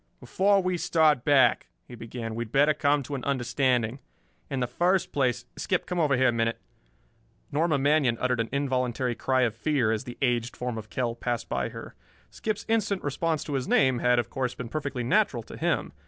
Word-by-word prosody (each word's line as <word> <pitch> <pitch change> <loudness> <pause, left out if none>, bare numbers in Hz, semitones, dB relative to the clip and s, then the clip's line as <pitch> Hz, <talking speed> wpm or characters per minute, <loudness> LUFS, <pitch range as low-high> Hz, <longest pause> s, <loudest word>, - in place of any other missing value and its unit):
"Before 195 0 +2
we 185 -1 0
start 155 -6 +3
back," 145 -3 +4 0.2
he - - -12
began, 115 -1 -6
"we 115 +1 -2
had 110 - -16
better 145 +3 +4
come 145 -1 +1
to 145 - -7
an 130 -3 -4
understanding. 125 -2 0 0.5
In 135 -2 -2
the 125 - +1
first 175 +8 +1
place 130 -4 0
Skip, - - -1
come 180 -1 -3
over 145 -5 +2
here 130 +1 +4
a - - +3
minute." 115 0 -1 0.9
Norma 155 +1 +1
Manion 140 -4 +2
uttered 125 -1 0
an 115 - -1
involuntary 130 -2 -1
cry 130 +2 0
of 120 -4 +2
fear 125 -2 +1
as 110 +3 -2
the 120 - -8
aged 120 -2 0
form 125 -2 -3
of 110 0 -11
Kell 120 +1 -1
passed 120 -1 -3
by - - -1
her. - - -9 0.4
Skip's 215 -1 -4
instant 215 -4 0
response 155 +2 -1
to 150 - -5
his 135 -2 -1
name 130 -2 +3
had, 125 0 +3
of 120 - -1
course, 130 -2 -2
been 120 -2 -6
perfectly 140 -3 -3
natural 120 - +1
to - - -11
him. - - -1
130 Hz, 200 wpm, -27 LUFS, 120-150 Hz, 0.9 s, back